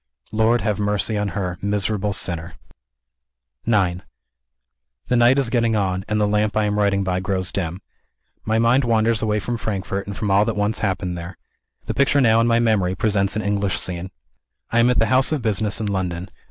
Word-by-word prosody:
Lord, 110 Hz, +2 st, +2 dB
have 105 Hz, -1 st, -1 dB
mercy 105 Hz, +1 st, 0 dB
on 105 Hz, 0 st, -1 dB
her 90 Hz, -3 st, -3 dB
miserable 105 Hz, 0 st, -1 dB
sinner! 85 Hz, -3 st, -4 dB, 1.1 s
IX 95 Hz, -6 st, +1 dB, 1.1 s
The 125 Hz, -, +2 dB
night 120 Hz, +2 st, +5 dB
is 130 Hz, -4 st, +1 dB
getting 115 Hz, -2 st, +2 dB
on; 95 Hz, -2 st, -1 dB
and 105 Hz, 0 st, 0 dB
the 105 Hz, -, +2 dB
lamp 105 Hz, +1 st, 0 dB
I 110 Hz, -, +3 dB
am 105 Hz, 0 st, 0 dB
writing 100 Hz, -1 st, +2 dB
by 90 Hz, -1 st, -1 dB
grows 95 Hz, -1 st, -2 dB
dim. 90 Hz, 0 st, -4 dB, 0.6 s
My 110 Hz, +1 st, 0 dB
mind 120 Hz, +4 st, +3 dB
wanders 115 Hz, -1 st, +2 dB
away 105 Hz, -1 st, 0 dB
from 120 Hz, +4 st, -3 dB
Frankfort, 100 Hz, -2 st, -3 dB
and 100 Hz, -, -6 dB
from 105 Hz, -2 st, -1 dB
all 100 Hz, +1 st, +5 dB
that 115 Hz, -, -2 dB
once 105 Hz, +1 st, -1 dB
happened 90 Hz, -3 st, -2 dB
there. 85 Hz, +1 st, -8 dB, 0.5 s
The -, -, -3 dB
picture 140 Hz, +2 st, +3 dB
now 115 Hz, -3 st, +4 dB
in 115 Hz, -, +2 dB
my 115 Hz, 0 st, +3 dB
memory 105 Hz, -6 st, +1 dB
presents 100 Hz, -2 st, 0 dB
an 110 Hz, -, -2 dB
English 100 Hz, -2 st, 0 dB
scene. 90 Hz, 0 st, -4 dB, 0.6 s
I 115 Hz, -, +2 dB
am 120 Hz, +1 st, +5 dB
at 125 Hz, -, +2 dB
the 115 Hz, -, +3 dB
house 130 Hz, +6 st, +3 dB
of 150 Hz, -6 st, -1 dB
business 110 Hz, -1 st, +1 dB
in 110 Hz, -, -2 dB
London. 95 Hz, -2 st, -3 dB
105 Hz, 195 wpm, -21 LUFS, 95-115 Hz, 1.1 s, night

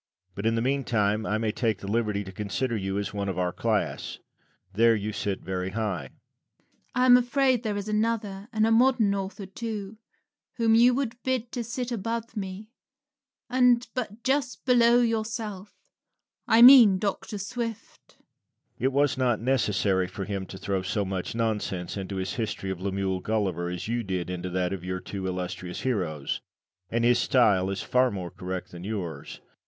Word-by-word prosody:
But 100 Hz, +3 st, -2 dB
in 115 Hz, -, +2 dB
the 115 Hz, -, 0 dB
meantime 110 Hz, -6 st, 0 dB
I 105 Hz, -, +1 dB
may 110 Hz, -1 st, 0 dB
take 110 Hz, -2 st, 0 dB
the 100 Hz, -, -9 dB
liberty 105 Hz, -1 st, 0 dB
to 95 Hz, -, -9 dB
consider 105 Hz, +5 st, -2 dB
you 95 Hz, -1 st, -2 dB
as 100 Hz, 0 st, -3 dB
one 100 Hz, -1 st, -2 dB
of 95 Hz, -, -3 dB
our 90 Hz, -1 st, 0 dB
class. -, -, -1 dB, 0.6 s
There 115 Hz, +3 st, +5 dB
you 105 Hz, 0 st, -3 dB
sit 100 Hz, -2 st, -2 dB
very 95 Hz, 0 st, -3 dB
high. 100 Hz, -7 st, -2 dB
Rabelais. -, -, -17 dB, 0.8 s
I 250 Hz, -, +3 dB
am 250 Hz, -1 st, +8 dB
afraid 255 Hz, 0 st, +2 dB
there 215 Hz, -3 st, -2 dB
is 200 Hz, 0 st, -4 dB
another, 215 Hz, -2 st, -1 dB
and 220 Hz, -2 st, +2 dB
a 225 Hz, -, +2 dB
modern 230 Hz, -3 st, +4 dB
author 195 Hz, +1 st, -4 dB
too, 210 Hz, +1 st, -6 dB, 0.6 s
whom 230 Hz, -2 st, +3 dB
you 240 Hz, +2 st, +6 dB
would 245 Hz, -3 st, -3 dB
bid 255 Hz, -2 st, -1 dB
to 245 Hz, -, -3 dB
sit 245 Hz, +2 st, -4 dB
above 230 Hz, +1 st, -3 dB
me, 200 Hz, +2 st, -6 dB, 0.8 s
and 245 Hz, -1 st, +3 dB
but 235 Hz, -3 st, -5 dB
just 265 Hz, -2 st, -1 dB
below 240 Hz, -1 st, +5 dB
yourself 220 Hz, -3 st, -2 dB, 0.7 s
I 230 Hz, +1 st, +6 dB
mean 245 Hz, -7 st, +10 dB
Dr. 205 Hz, +1 st, -3 dB
Swift. 230 Hz, +2 st, -6 dB
Lucian. -, -, -34 dB, 0.6 s
It 130 Hz, +3 st, +1 dB
was 140 Hz, -1 st, +2 dB
not 120 Hz, -4 st, +2 dB
necessary 105 Hz, -6 st, +1 dB
for 95 Hz, +1 st, -6 dB
him 95 Hz, -1 st, -4 dB
to 95 Hz, -, -9 dB
throw 95 Hz, -1 st, -2 dB
so 100 Hz, +2 st, -1 dB
much 95 Hz, +2 st, -4 dB
nonsense 105 Hz, -6 st, -2 dB
into 95 Hz, 0 st, -5 dB
his 95 Hz, 0 st, -3 dB
history 110 Hz, -4 st, -3 dB
of 95 Hz, -1 st, -6 dB
Lemuel 95 Hz, -1 st, -1 dB
Gulliver 95 Hz, -5 st, -1 dB
as 90 Hz, +1 st, -5 dB
you 120 Hz, +1 st, -1 dB
did 90 Hz, -4 st, -3 dB
into 90 Hz, 0 st, -4 dB
that 90 Hz, +1 st, -1 dB
of 95 Hz, -3 st, -6 dB
your 90 Hz, 0 st, -3 dB
two 95 Hz, +1 st, -5 dB
illustrious 90 Hz, -1 st, -4 dB
heroes; 90 Hz, -, -2 dB, 0.5 s
and 115 Hz, +2 st, 0 dB
his 120 Hz, 0 st, +4 dB
style 100 Hz, -7 st, +3 dB
is 100 Hz, 0 st, -3 dB
far 125 Hz, 0 st, +3 dB
more 95 Hz, -5 st, -5 dB
correct 90 Hz, 0 st, -6 dB
than 85 Hz, 0 st, -9 dB
yours. 90 Hz, -8 st, -5 dB
115 Hz, 180 wpm, -27 LUFS, -, 0.8 s, mean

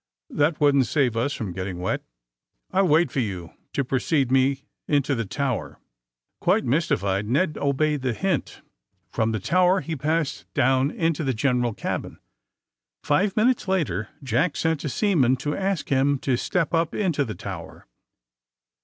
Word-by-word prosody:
^^That 150 Hz, +2 st, +1 dB
wouldn't 140 Hz, -4 st, +4 dB
save 130 Hz, -3 st, +1 dB
us 120 Hz, +5 st, 0 dB
from 105 Hz, -9 st, -4 dB
getting 95 Hz, 0 st, -4 dB
wet. 90 Hz, +1 st, -2 dB, 0.7 s
I'll 190 Hz, 0 st, +3 dB
wait 165 Hz, +2 st, +3 dB
for -, -, -1 dB
you 95 Hz, -8 st, -3 dB, 0.2 s
to 140 Hz, -, 0 dB
precede 135 Hz, +1 st, 0 dB
me 135 Hz, +1 st, +2 dB, 0.2 s
into 145 Hz, -1 st, +2 dB
the 115 Hz, -3 st, -1 dB
tower.'* 135 Hz, 0 st, -2 dB, 0.6 s
Quite -, -, +2 dB
mystified 105 Hz, -, 0 dB
Ned 155 Hz, +5 st, +1 dB
obeyed 145 Hz, +1 st, +1 dB
the 130 Hz, -2 st, 0 dB
hint. 185 Hz, +1 st, -2 dB, 0.5 s
From 110 Hz, 0 st, 0 dB
the 110 Hz, -, -1 dB
tower 185 Hz, -, +3 dB
he 165 Hz, -, -4 dB
passed 150 Hz, -, -2 dB
down 130 Hz, +2 st, +3 dB
into 165 Hz, 0 st, -1 dB
the 130 Hz, -3 st, 0 dB
general 125 Hz, -2 st, +1 dB
cabin. -, -, -4 dB, 0.9 s
Five 190 Hz, +8 st, +1 dB
minutes 235 Hz, 0 st, +2 dB
later 120 Hz, -, -1 dB
Jack 135 Hz, +7 st, +1 dB
sent 160 Hz, -3 st, 0 dB
a 150 Hz, -, -2 dB
seaman 140 Hz, -, +2 dB
to 145 Hz, +3 st, -3 dB
ask 195 Hz, -3 st, -2 dB
him 140 Hz, +1 st, +2 dB
to 130 Hz, -, +1 dB
step 170 Hz, +6 st, -1 dB
up 165 Hz, -1 st, +1 dB
into 170 Hz, -8 st, +1 dB
the 110 Hz, -5 st, -5 dB
tower. -, -, -8 dB
140 Hz, 155 wpm, -24 LUFS, 120-165 Hz, 0.9 s, wouldn't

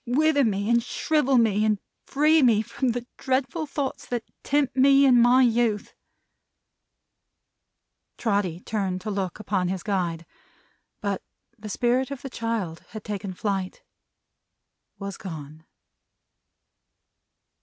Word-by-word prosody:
Wither 285 Hz, +3 st, +3 dB
me 200 Hz, -3 st, 0 dB
and 235 Hz, +1 st, +4 dB
shrivel 275 Hz, +2 st, +1 dB
me, 215 Hz, -3 st, +3 dB
and 215 Hz, -2 st, +2 dB, 0.3 s
free 305 Hz, +3 st, +4 dB
me 225 Hz, -5 st, +4 dB
from 260 Hz, +4 st, -3 dB
the 240 Hz, 0 st, -2 dB
dreadful 270 Hz, +4 st, -1 dB
thoughts 280 Hz, -2 st, -3 dB
that 240 Hz, -2 st, -2 dB, 0.2 s
tempt 285 Hz, -2 st, 0 dB
me 275 Hz, +1 st, +6 dB
in 245 Hz, -3 st, +6 dB
my 250 Hz, +2 st, +6 dB
youth!" 230 Hz, -3 st, +1 dB, 2.2 s
Trotty 200 Hz, -6 st, 0 dB
turned 195 Hz, -4 st, -2 dB
to 215 Hz, -, -4 dB
look 195 Hz, -2 st, -3 dB
upon 195 Hz, -3 st, -1 dB
his 185 Hz, -1 st, -3 dB
guide. 175 Hz, -5 st, -2 dB, 0.8 s
But, 200 Hz, -1 st, -2 dB, 0.3 s
the 215 Hz, -2 st, -9 dB
Spirit 245 Hz, +5 st, +1 dB
of 280 Hz, -2 st, -7 dB
the 270 Hz, -, -6 dB
child 225 Hz, -9 st, -3 dB
had 215 Hz, -1 st, -8 dB
taken 205 Hz, -2 st, -4 dB
flight. 195 Hz, -2 st, -3 dB, 1.1 s
Was 200 Hz, -1 st, -6 dB
gone. 155 Hz, -3 st, -9 dB
225 Hz, 125 wpm, -25 LUFS, 195-260 Hz, 2.2 s, me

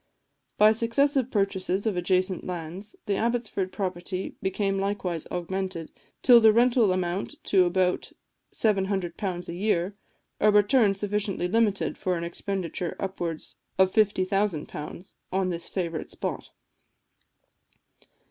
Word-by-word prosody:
By 215 Hz, +1 st, +7 dB
successive 250 Hz, +4 st, +1 dB
purchases 195 Hz, -2 st, 0 dB
of 215 Hz, -4 st, +1 dB
adjacent 185 Hz, +1 st, +1 dB
lands, 180 Hz, +4 st, -6 dB
the 200 Hz, -1 st, 0 dB
Abbotsford 230 Hz, -5 st, -1 dB
property 185 Hz, -1 st, -4 dB
became 195 Hz, 0 st, 0 dB
likewise 195 Hz, -4 st, -2 dB
augmented, 180 Hz, -1 st, -3 dB, 0.3 s
till 245 Hz, -2 st, +8 dB
the 220 Hz, -1 st, +7 dB
rental 235 Hz, -2 st, +4 dB
amounted 185 Hz, +1 st, -2 dB
to 185 Hz, -2 st, +4 dB
about 180 Hz, +1 st, 0 dB, 0.4 s
£700 190 Hz, -3 st, -1 dB
a -, -, -5 dB
year 190 Hz, 0 st, 0 dB, 0.4 s
a 215 Hz, -, +5 dB
return 210 Hz, 0 st, +4 dB
sufficiently 205 Hz, -2 st, -1 dB
limited 210 Hz, 0 st, +1 dB
for 180 Hz, -2 st, 0 dB
an 170 Hz, -, -4 dB
expenditure 175 Hz, 0 st, -3 dB
of 195 Hz, -, -3 dB
upwards 170 Hz, -4 st, -5 dB, 0.2 s
of 190 Hz, 0 st, +4 dB
£50,000 190 Hz, -5 st, 0 dB, 0.2 s
on 190 Hz, 0 st, +1 dB
this 170 Hz, -1 st, -5 dB
favourite 170 Hz, -4 st, -3 dB
spot. -, -, -4 dB
190 Hz, 120 wpm, -27 LUFS, 180-210 Hz, 0.4 s, till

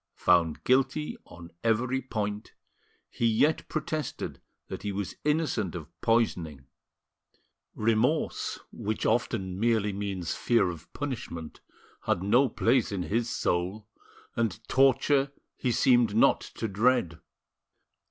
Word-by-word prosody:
Found 85 Hz, -3 st, +2 dB
guilty 135 Hz, +4 st, +1 dB
on 85 Hz, -1 st, -12 dB
every 120 Hz, +4 st, +1 dB
point, 105 Hz, -4 st, -4 dB, 0.5 s
he 115 Hz, -, 0 dB
yet 130 Hz, +8 st, +2 dB
protested 155 Hz, 0 st, -4 dB, 0.3 s
that -, -, -6 dB
he 100 Hz, +1 st, -3 dB
was 100 Hz, -1 st, -3 dB
innocent 150 Hz, -, 0 dB
of 80 Hz, -4 st, -7 dB
poisoning. 85 Hz, -, 0 dB, 1.1 s
Remorse, 115 Hz, +8 st, +1 dB
which 110 Hz, +1 st, -3 dB
often 95 Hz, -5 st, 0 dB
merely 110 Hz, -2 st, +2 dB
means 95 Hz, -4 st, -3 dB
fear 115 Hz, -7 st, +2 dB
of 80 Hz, -3 st, -12 dB
punishment, 110 Hz, -, -5 dB, 0.4 s
had 90 Hz, -, +1 dB
no 120 Hz, +7 st, +4 dB
place 115 Hz, +1 st, +2 dB
in 95 Hz, -3 st, -2 dB
his 115 Hz, +5 st, -1 dB
soul, 100 Hz, -1 st, -1 dB, 0.5 s
and 115 Hz, -1 st, -2 dB
torture 135 Hz, +1 st, +3 dB, 0.2 s
he 125 Hz, -, -1 dB
seemed 120 Hz, -3 st, +3 dB
not 115 Hz, -, +4 dB
to 115 Hz, -, -2 dB
dread. 105 Hz, -5 st, +1 dB
110 Hz, 115 wpm, -28 LUFS, 95-125 Hz, 1.1 s, no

